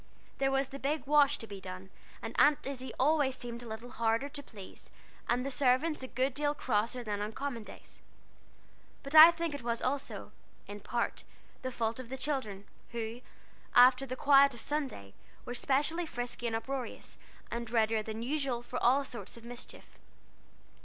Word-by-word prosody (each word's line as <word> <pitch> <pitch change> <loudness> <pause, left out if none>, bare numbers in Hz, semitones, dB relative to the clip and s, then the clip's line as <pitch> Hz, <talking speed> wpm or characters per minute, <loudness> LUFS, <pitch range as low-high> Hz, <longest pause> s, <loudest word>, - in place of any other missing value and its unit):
There 270 - +2
was 270 0 0
the 275 - -8
big 290 +3 -1
wash 290 0 +4
to - - -6
be 200 -3 -9
done, 185 0 -8 0.3
and - - -5
Aunt 295 -1 +5
Izzie 260 -1 -5
always 280 -1 +3
seemed 240 -1 -6
a 240 - -9
little 225 +2 -7
harder 230 +3 0
to 285 0 -6
please, 205 -8 -12 0.4
and 245 +2 +1
the 275 - -2
servants 275 +4 +2
a 260 - -5
good 260 +2 0
deal 290 +1 0
crosser 240 -1 -1
than 205 -2 -3
on 210 +1 -3
common 265 -4 -4
days. - - -13 1.0
But 275 +1 -8
I 315 +1 +12
think 335 -2 -2
it 285 - -5
was 235 -1 -1
also, 275 +2 -3 0.3
in 205 +1 -8
part, 235 +3 -2 0.4
the 255 - -3
fault 230 -1 -2
of 250 -2 -8
the 265 - -5
children, 260 -9 -2 0.3
who, 230 +1 -4 0.5
after 255 +2 +7
the 255 - -4
quiet 280 -1 +5
of - - -8
Sunday, 245 - -3 0.3
were 245 - -4
specially 295 +7 0
frisky 245 -2 -4
and 225 - -1
uproarious, 255 +2 -5 0.3
and 235 -1 -4
readier 225 -1 +2
than 220 +1 -5
usual 265 -3 -1
for 250 +1 -5
all 265 +4 +4
sorts 235 -4 -8
of 230 - -13
mischief. 240 0 -10
250 Hz, 180 wpm, -32 LUFS, 230-275 Hz, 1.0 s, I